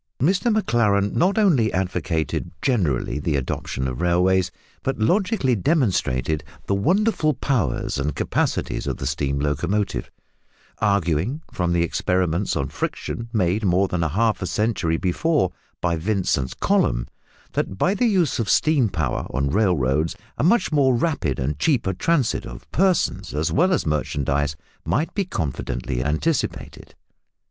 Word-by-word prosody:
Mr 190 - +2
Maclaren 105 - +2
not 185 +4 +2
only 155 - +3
advocated 85 -4 -1
generally 85 - 0
the 75 0 -1
adoption 65 0 -2
of 65 -1 -4
railways, 90 +1 +3 0.3
but 135 - -2
logically 180 - +2
demonstrated 90 - +1 0.2
the - - 0
wonderful 160 - +2
powers 110 - -1
and 75 +2 -1
capacities - - -1
of - - -2
the - - -5
steam 70 -1 -1
locomotive, 75 +1 -1 0.7
arguing, 100 - 0
from 90 -1 0
the 85 -1 +2
experiments 90 +2 0
on 70 - -1
friction 115 - -4
made 105 0 +1
more 95 0 +3
than 90 -2 -2
half 105 +9 +1
a 90 - -2
century 100 -7 0
before 95 - +1 0.3
by 85 -1 +1
Vince 95 +3 0
and 65 -2 -3
Colomb, - - +2 0.5
that 95 - -2
by 185 - +2
the 240 +4 +2
use 180 - +2
of 115 - -1
steam 145 -8 +3
power 80 -8 -2
on 70 +2 -1
railroads 80 -4 +1 0.2
a 115 - -2
much 185 +3 +3
more 135 -4 +3
rapid 115 - 0
and 70 +2 -2
cheaper 115 - +1
transit 140 - +1
of - - -10
persons 185 - +1
as 75 +2 0
well 180 +6 +3
as 180 - +1
merchandise 75 -1 0 0.3
might 155 +6 -1
be 200 -1 0
confidently 65 - -3
anticipated. 80 - -2
95 Hz, 140 wpm, -23 LUFS, -, 0.7 s, only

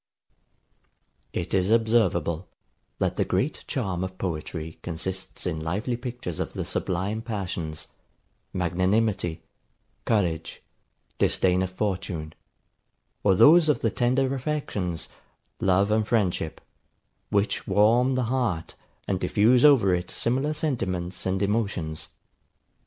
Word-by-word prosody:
It - - -4
is 95 0 +2
observable, 105 -7 +2 0.5
that - - -1
the - - +3
great - - -1
charm 90 -2 -2
of 95 0 -5
poetry 80 -2 -4
consists 95 +3 -5
in 85 -4 -1
lively 100 +10 -2
pictures 120 - -5
of - - -3
the - - -3
sublime 95 +5 -2
passions, 90 -8 -4 0.7
magnanimity, 95 0 0 0.6
courage, 90 -8 0 0.6
disdain 90 0 +3
of 95 - -1
fortune; 90 -5 -3 0.9
or 95 -2 +4
those 155 - +7
of 140 -6 +2
the 115 - +1
tender 130 +3 +1
affections, 125 - -2 0.5
love 95 +2 +3
and 110 0 +2
friendship; 95 -9 0 0.7
which 100 +1 0
warm 115 +6 +4
the 130 - +1
heart, 115 -9 -1 0.3
and 95 -2 0
diffuse 110 +7 +4
over 130 -11 +6
it 90 0 -1
similar 135 +6 0
sentiments 95 - -2
and 95 +1 0
emotions. 100 -7 -1
95 Hz, 115 wpm, -26 LUFS, 90-115 Hz, 0.9 s, those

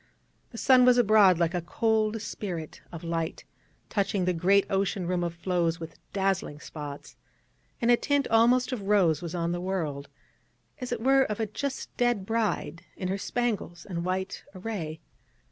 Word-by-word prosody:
The 230 - -10
sun 255 +1 +5
was 250 0 +6
abroad 210 -6 +6
like 170 0 +1
a 180 - -1
cold 220 +4 +1
spirit 175 -7 -5
of 170 -1 -8
light, 165 -1 -3 0.4
touching 195 -2 0
the 180 - +2
great 195 +4 +3
ocean 195 -1 0
room 180 0 0
of 170 -1 -3
floes 170 -1 0
with 165 -1 -9
dazzling 190 -6 -1
spots, 145 -2 -8 0.6
and 235 0 +3
a 240 - +6
tint 285 +1 +1
almost 245 +3 +4
of 250 -5 -3
rose 185 -7 +3
was 170 0 -5
on 170 -1 -1
the 175 0 -2
world, 160 -7 -3 0.7
as 250 -1 -5
it 240 -2 -2
were 270 +2 +4
of 210 0 -4
a 220 - +1
just 270 +6 -5
dead 240 -5 +1
bride 210 -7 -1
in 185 - -3
her 195 +1 -1
spangles 210 -8 -2
and 170 -3 -4
white 185 +1 -3
array. 180 -6 -5
190 Hz, 170 wpm, -28 LUFS, 170-225 Hz, 0.7 s, was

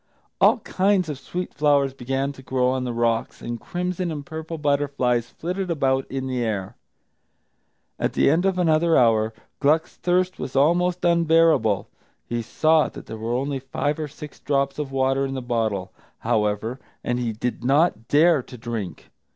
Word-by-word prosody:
All - - +5
kinds 190 -2 +1
of 145 -3 -5
sweet 180 +6 -5
flowers 140 -2 +2
began 135 +2 -2
to 135 - -13
grow 130 -1 +1
on 130 -1 -1
the 125 - -2
rocks, 115 -1 0
and 120 -1 -5
crimson 180 0 -3
and 145 -2 -5
purple 160 0 -6
butterflies 140 -5 0
flitted 180 +2 -4
about 135 -5 0
in 135 0 -3
the 130 -2 -1
air. 105 -1 -3 1.2
At - - 0
the - - +3
end 160 +5 +3
of 190 -1 0
another 165 -1 +3
hour, 110 -2 +3 0.3
Gluck's 155 +3 +1
thirst 180 +1 0
was 130 - -5
almost 175 +6 +2
unbearable. 165 - +3 0.4
He 120 0 -2
saw 155 +7 +2
that - - -11
there 110 - -7
were 115 +2 -2
only 135 +2 -1
five 145 +3 -2
or 155 - -2
six 150 0 -11
drops 140 0 0
of 145 -2 -3
water 135 0 +1
in 135 0 -3
the - - -2
bottle, 110 -6 -2 0.2
however, 105 +4 -1 0.2
and 120 0 -1
he 120 -2 -1
did 120 +2 -4
not 135 -3 +2
dare 155 0 +4
to 125 - -12
drink. 115 -5 -6
135 Hz, 170 wpm, -23 LUFS, 120-160 Hz, 1.2 s, All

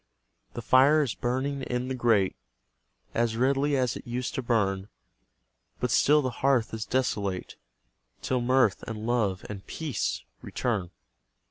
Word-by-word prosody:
The - - -5
fire 145 +4 +5
is 125 -7 -2
burning 130 +5 -2
in 125 -1 -2
the 130 - -2
grate 115 -6 +2 0.8
As 115 -1 0
redly 140 +3 +2
as 125 -3 0
it - - -9
used 125 +1 -3
to - - -2
burn; 100 -5 0 0.9
But 125 - -1
still 150 +4 +4
the 130 - -1
hearth 130 -5 +2
is 110 -1 -3
desolate, 100 -8 -1 0.7
Till 125 -1 0
mirth, 125 -4 +3
and 110 -1 -5
love, 110 -6 0
and 100 -2 -7
PEACE 150 - -3 0.2
return. 105 -8 -2
120 Hz, 140 wpm, -27 LUFS, 110-130 Hz, 0.9 s, fire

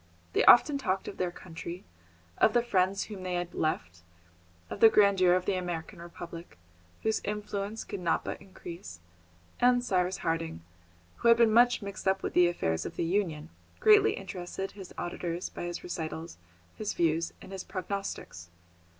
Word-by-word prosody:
They - - +3
often 280 +3 +7
talked 190 -7 -1
of - - -7
their 180 - 0
country, 175 0 -8 0.6
of 215 - +5
the 240 - +3
friends 195 -3 +1
whom 205 -3 -8
they 185 -1 -3
had 175 0 -3
left, 90 - -2 0.7
of - - -7
the 225 - +9
grandeur 195 -4 +5
of 185 0 -1
the 200 - +1
American 175 -3 -4
Republic, 170 - -9 0.5
whose 220 0 +1
influence 210 +1 -4
could 200 - -6
not 170 -2 0
but - - -5
increase, 170 - -10 0.6
and 245 0 +4
Cyrus 185 -3 +1
Harding, 165 - -2 0.5
who - - 0
had 230 0 +7
been 230 -2 +4
much 240 -1 +5
mixed 200 -1 -6
up 190 0 +2
with - - -3
the 180 0 +6
affairs 80 - -1
of - - -6
the - - -1
Union, 165 -4 -1 0.3
greatly 425 -1 +6
interested 190 0 -5
his 195 -3 -11
auditors 175 0 -3
by - - -6
his 175 0 -5
recitals, 165 - -5 0.4
his 215 - -3
views, 165 0 +1
and - - -12
his 190 -1 -5
prognostics. 185 - -5
185 Hz, 165 wpm, -29 LUFS, 170-205 Hz, 0.7 s, the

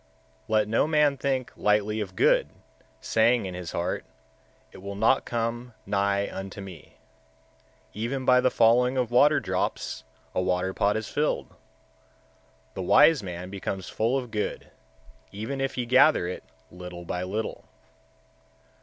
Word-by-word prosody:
122. - - -11
Let 110 -1 +3 0.2
no - - -1
man 150 -2 +3
think 135 -2 -2
lightly 105 +1 +1
of 95 -3 -6
good, - - +3 0.5
saying 115 0 +2
in 95 - -5
his 90 -1 -6
heart, 85 - -2 0.7
It - - -13
will 100 +1 -7
not 110 +6 +2
come 120 0 -3
nigh 100 0 0
unto 95 +1 -7
me. 95 -5 -11 1.0
Even 125 +5 -3
by 125 0 +5
the 130 - +3
falling 125 +3 +3
of 125 -2 0
water 145 +5 +5
drops - - -3 0.3
a - - 0
water 90 +1 0
pot 100 +2 +1
is 110 -1 -4
filled; 150 +1 -1 1.2
the 95 - -5
wise 150 - +5
man 90 -1 -7
becomes 95 -1 -5
full 115 +5 0
of 125 -3 -5
good, 105 -1 -4 0.6
even 110 +7 -5
if 135 - -2
he 125 - -2
gather 130 - +4
it 90 - -6 0.3
little 90 -1 -9
by 90 +1 -3
little. 105 +4 -4
110 Hz, 145 wpm, -26 LUFS, 95-125 Hz, 1.2 s, by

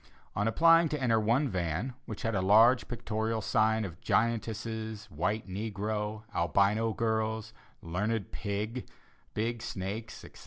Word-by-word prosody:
On 105 - +1
applying 165 +6 +5
to 150 - -2
enter 115 -4 +3
one 120 +7 +2
van, 95 - -2
which 110 -3 -6
had 115 - 0
a 95 - +1
large 110 +6 +5
pictorial 110 -1 -2
sign 110 +1 +2
of 85 -6 -9
giantesses, 110 -1 -1
white 95 +9 -1
negro, 105 +1 -3
Albino 100 +6 +2
girls, 110 0 -1 0.3
learned 100 +5 -2
pig, 105 +4 -3 0.5
big 115 +2 -1
snakes, 105 +4 -5
etc. - - -14
110 Hz, 130 wpm, -30 LUFS, 105-115 Hz, 0.5 s, applying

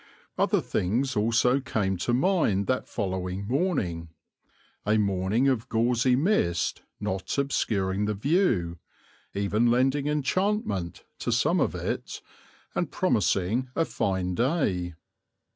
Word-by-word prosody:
Other - - +2
things 120 +9 -1
also 115 +5 +3
came 105 -7 -1
to 105 - -1
mind 125 - +2
that 130 +4 -1
following 95 -1 -3
morning, 105 - -1 0.7
a 105 +1 +2
morning 100 +4 +1
of 125 -2 0
gauzy 120 +2 +2
mist 130 - +1 0.2
not 95 +2 -3
obscuring 105 -8 0
the 105 0 -1
view, 105 - +1 0.6
even 105 +4 +2
lending 135 +4 +2
enchantment 150 - -1 0.2
to - - -2
some - - +2
of - - +1
it, - - -4 0.5
and - - -1
promising 110 +8 +1
a 165 - +2
fine 95 - -1
day. 95 - 0
110 Hz, 115 wpm, -27 LUFS, 95-135 Hz, 0.7 s, also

